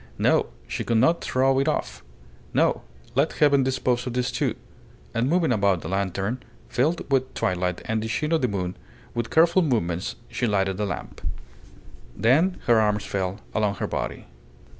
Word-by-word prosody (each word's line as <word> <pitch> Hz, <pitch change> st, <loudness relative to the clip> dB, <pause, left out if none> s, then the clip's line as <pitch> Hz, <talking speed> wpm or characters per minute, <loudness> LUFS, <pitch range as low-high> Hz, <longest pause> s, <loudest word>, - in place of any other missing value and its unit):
No; -, -, +3 dB, 0.2 s
she -, -, -3 dB
could 115 Hz, -, +1 dB
not 165 Hz, +9 st, +3 dB
throw 130 Hz, +1 st, +2 dB
it 135 Hz, -, +1 dB
off. 155 Hz, -, -2 dB, 0.5 s
No; -, -, +3 dB, 0.3 s
let 140 Hz, +5 st, +2 dB
Heaven 145 Hz, -2 st, +4 dB
dispose 125 Hz, -1 st, 0 dB
of 125 Hz, -, -3 dB
these 125 Hz, 0 st, 0 dB
two. -, -, 0 dB, 0.6 s
And 120 Hz, +3 st, +1 dB
moving 170 Hz, -3 st, +2 dB
about 100 Hz, -5 st, +2 dB
the -, -, -6 dB
lantern, 95 Hz, +5 st, -1 dB, 0.3 s
filled 150 Hz, +4 st, 0 dB
with 130 Hz, -1 st, +2 dB
twilight 90 Hz, -1 st, -1 dB
and 110 Hz, 0 st, 0 dB
the 110 Hz, -, -3 dB
sheen 150 Hz, +7 st, -1 dB
of 165 Hz, -, +3 dB
the 125 Hz, -, +2 dB
moon, 95 Hz, -4 st, -3 dB, 0.4 s
with 120 Hz, -1 st, -2 dB
careful 170 Hz, +3 st, +5 dB
movements 95 Hz, -, 0 dB
she 120 Hz, -, -1 dB
lighted 95 Hz, -2 st, +1 dB
the 105 Hz, 0 st, -1 dB
lamp. -, -, -6 dB, 1.0 s
Then 155 Hz, +11 st, +3 dB
her 115 Hz, -2 st, +5 dB
arms 105 Hz, -1 st, +1 dB
fell 95 Hz, -1 st, -2 dB
along 105 Hz, -2 st, +1 dB
her -, -, -2 dB
body. -, -, -4 dB
120 Hz, 170 wpm, -25 LUFS, 100-135 Hz, 1.0 s, careful